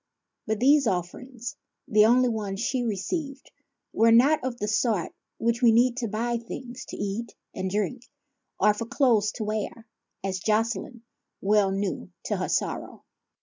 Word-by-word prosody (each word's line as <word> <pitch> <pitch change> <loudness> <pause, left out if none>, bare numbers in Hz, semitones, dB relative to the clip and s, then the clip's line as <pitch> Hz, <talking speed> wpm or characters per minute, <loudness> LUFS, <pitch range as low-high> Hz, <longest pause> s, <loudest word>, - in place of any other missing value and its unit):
But 220 -1 -1
these 280 +1 +5
offerings, 225 +7 -4 0.3
the 215 0 +5
only 250 +2 +4
ones 210 -4 -3
she 245 +2 0
received, 275 - -3 0.4
were 230 +1 +4
not 265 +6 +5
of 255 -2 -3
that 210 - -3
sort 210 -4 0 0.2
which 235 +1 0
we 235 -2 +6
need 240 +2 +4
to 245 -3 -1
buy 235 +3 -1
things 245 +2 -8
to - - -8
eat 205 +3 -4 0.2
and 190 0 -3
drink 210 +6 -2 0.5
or 210 +2 +5
for 225 +2 -5
clothes 230 -6 +3
to 220 - -4
wear, 215 +2 -3 0.4
as 190 -1 -2
Jocelyne 225 +3 -1 0.4
well 205 0 +3
knew, 195 - -3
to - - -1
her - - -2
sorrow. - - -2
225 Hz, 155 wpm, -26 LUFS, 210-245 Hz, 0.5 s, we